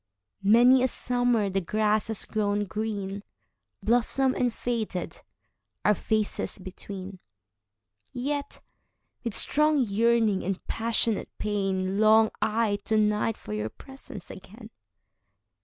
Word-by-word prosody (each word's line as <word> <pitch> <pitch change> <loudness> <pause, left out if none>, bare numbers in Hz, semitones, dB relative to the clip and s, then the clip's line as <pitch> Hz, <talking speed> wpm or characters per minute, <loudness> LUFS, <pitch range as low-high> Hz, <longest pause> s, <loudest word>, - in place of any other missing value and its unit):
Many 240 +6 +6
a 255 - +3
summer 245 -3 0
the 195 +1 0
grass 215 +3 +1
has 220 -2 -5
grown 205 -1 -1
green, 200 0 -4 0.6
Blossomed 245 +3 +2
and 245 -1 +1
faded, 225 -6 -4 0.6
our 210 - +6
faces 215 +1 -1
between:Yet, 105 - -8 0.6
with 230 -4 -1
strong 300 0 +3
yearning 225 -1 +2
and 190 0 -2
passionate 225 -1 0
pain, 195 -2 -1
Long 220 0 +5
I 215 -1 +1
to 220 - +2
night 210 +1 +1
for 105 - -8
your 105 +1 -2
presence 265 - -11
again. 215 +4 -12
215 Hz, 105 wpm, -27 LUFS, 195-230 Hz, 0.6 s, Many